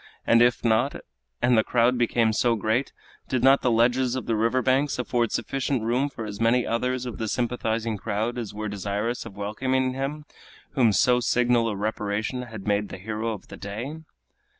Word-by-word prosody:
and 115 0 +5
if 120 0 +3
not, 115 +5 +2 0.5
and 120 0 +4
the 110 - +4
crowd 120 +2 +2
became 115 -2 +2
so 120 +2 +2
great, 110 +5 0 0.4
did 130 -2 0
not 135 +1 +6
the 125 - +2
ledges 120 +2 +2
of 130 - -4
the 115 - 0
river 115 +4 +1
banks 135 +2 +2
afford 120 -2 0
sufficient 135 -3 -1
room 125 +5 +1
for 115 -5 -7
as 105 0 -7
many 120 +2 +3
others 125 +2 -1
of 125 - -6
the 110 - -2
sympathizing 115 -1 -1
crowd 110 +3 -2
as 120 -4 -4
were 105 +1 -5
desirous 105 +4 -3
of 100 - -12
welcoming 130 +5 -1
him 140 +3 -4 0.5
whom 125 -6 +3
so 125 +4 +3
signal 120 -1 +2
a 105 - -3
reparation 105 +3 -2
had 115 -5 -8
made 105 -1 0
the - - -7
hero 110 +3 -3
of 105 -4 -8
the - - -9
day? 115 +10 -6
115 Hz, 190 wpm, -25 LUFS, 110-125 Hz, 0.5 s, not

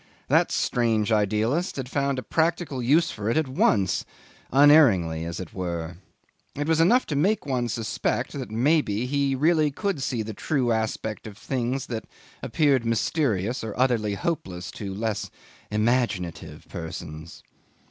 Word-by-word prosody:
That - - +3
strange 115 -3 +1
idealist 110 - +1
had 130 -2 -4
found 140 0 -1
a 130 - -3
practical 160 -1 0
use 150 +8 +3
for 110 0 -3
it 115 - +1
at 155 -3 +1
once 105 -7 +2 0.5
unerringly, 120 - +5
as 85 0 -5
it 95 -3 -8
were. 85 -2 -4 0.6
It 145 +1 -2
was 160 0 +3
enough 240 +10 +4
to 150 - -3
make 190 +8 +1
one 125 -4 -1
suspect 110 -1 -2
that, - - -5
maybe, 120 -1 +1
he 140 0 0
really 155 +2 +3
could 190 +1 -2
see 125 -4 -1
the 110 +1 -6
true 130 +1 0
aspect 110 -1 -2
of 105 -1 -10
things 130 +2 -2
that 110 -2 -5 0.4
appeared 135 0 +2
mysterious 115 - 0
or 110 +1 -6
utterly 115 -5 +2
hopeless 95 - -3
to 100 -2 -6
less 110 +2 -3 0.4
imaginative 105 -5 -1
persons. 80 -1 -8
120 Hz, 145 wpm, -25 LUFS, 105-145 Hz, 0.6 s, unerringly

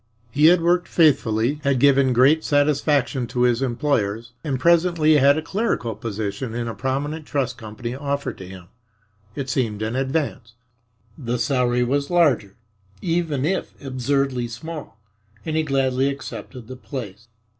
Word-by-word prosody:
He 150 +5 +5
had 175 0 +5
worked 175 +1 +2
faithfully, 135 -3 +2
had 140 -3 +1
given 135 -1 +4
great 135 +6 +4
satisfaction 145 -3 +1
to 125 - -3
his 120 0 +2
employers, 120 -4 -1
and 140 -5 -2
presently 170 -1 +4
had 140 +1 +5
a 155 - -2
clerical 195 - -1
position 110 +2 -4
in 120 -1 -3
a 115 - -3
prominent 145 +5 -3
trust 130 -4 -1
company 110 +2 -6
offered 140 +1 -3
to 95 - -8
him. 90 -2 -12 0.7
It 140 -2 -4
seemed 115 -5 -1
an 110 +3 -2
advance. 135 -3 -2 0.7
The 120 -2 -2
salary 125 -1 +1
was 140 +3 -1
larger, 145 - +2 0.4
even 165 - -1
if 190 +4 -2
absurdly 135 -1 -1
small, 130 -1 -8 0.5
and 155 - -2
he 160 - +3
gladly 135 -2 +1
accepted 135 -3 -8
the 130 +1 -8
place. 120 -4 -8
135 Hz, 145 wpm, -22 LUFS, 120-150 Hz, 0.7 s, He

